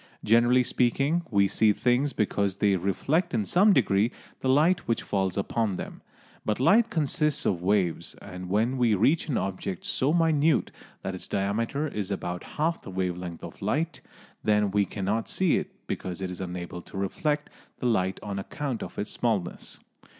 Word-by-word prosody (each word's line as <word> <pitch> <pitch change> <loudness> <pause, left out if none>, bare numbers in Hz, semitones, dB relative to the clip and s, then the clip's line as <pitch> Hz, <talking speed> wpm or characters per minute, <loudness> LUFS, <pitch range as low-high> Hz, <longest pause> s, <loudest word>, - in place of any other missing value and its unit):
Generally 120 +3 +5
speaking, 135 +7 +1
we 100 -2 +4
see 110 +2 +3
things 125 +6 +1
because 100 -4 0
they 100 0 +2
reflect 120 - 0
in 110 -3 +1
some 200 - +5
degree 110 - +3 0.3
the 130 - -1
light 160 +7 +3
which 115 - 0
falls 95 -2 -1
upon 100 0 0
them. - - -7 0.4
But 105 +1 -1
light 220 - +5
consists 150 - 0
of 90 -4 +1
waves, 90 -3 0
and 90 -2 -9
when 115 +6 +1
we 115 -3 +4
reach 145 - +2
an 130 - +1
object 95 -1 -3
so 135 +3 +1
minute 160 -2 +3 0.3
that 95 - -3
its 95 - -8
diameter 115 +9 -1
is 105 -8 -4
about 90 -3 -3
half 165 +3 0
the - - -10
wave 90 -1 -1
length 90 -2 -7
of - - -9
light, 150 +12 -1 0.4
then 105 -2 +2
we 100 0 +2
cannot 105 +3 -2
see 185 -4 +2
it - - -3 0.2
because 90 -2 -4
it 95 -1 -3
is 90 - -7
unable 90 -1 -5
to 95 - -10
reflect 150 - -1 0.3
the - - -5
light 95 -5 +1
on 100 -2 -3
account 130 +4 -4
of - - -7
its 105 - -3
smallness. 105 -7 -2
105 Hz, 175 wpm, -27 LUFS, 95-140 Hz, 0.4 s, Generally